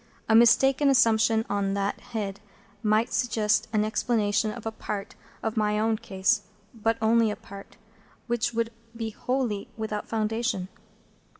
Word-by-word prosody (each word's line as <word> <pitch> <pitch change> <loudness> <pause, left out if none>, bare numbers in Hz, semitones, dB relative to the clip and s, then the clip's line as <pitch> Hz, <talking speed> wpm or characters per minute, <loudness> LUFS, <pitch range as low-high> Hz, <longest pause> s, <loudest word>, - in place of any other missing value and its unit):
A 220 - +3
mistaken 260 +5 +5
assumption 225 -3 +4
on 200 -1 -1
that 200 0 -1
head 200 -3 -5 0.4
might 215 +2 +2
suggest 215 -3 +1
an 215 -1 +2
explanation 215 -1 +1
of 220 +1 -7
a 225 - -2
part 205 -2 -5 0.3
of 220 -1 -2
my 210 -1 +1
own 220 +1 +2
case,—but 210 +3 -1
only 225 0 +3
a 210 - -2
part,—which 225 +3 -6
would 230 0 -1 0.2
be 225 -1 -4
wholly 245 -3 -2
without 215 -1 -4
foundation. 220 -3 -1
220 Hz, 130 wpm, -26 LUFS, 210-230 Hz, 0.4 s, mistaken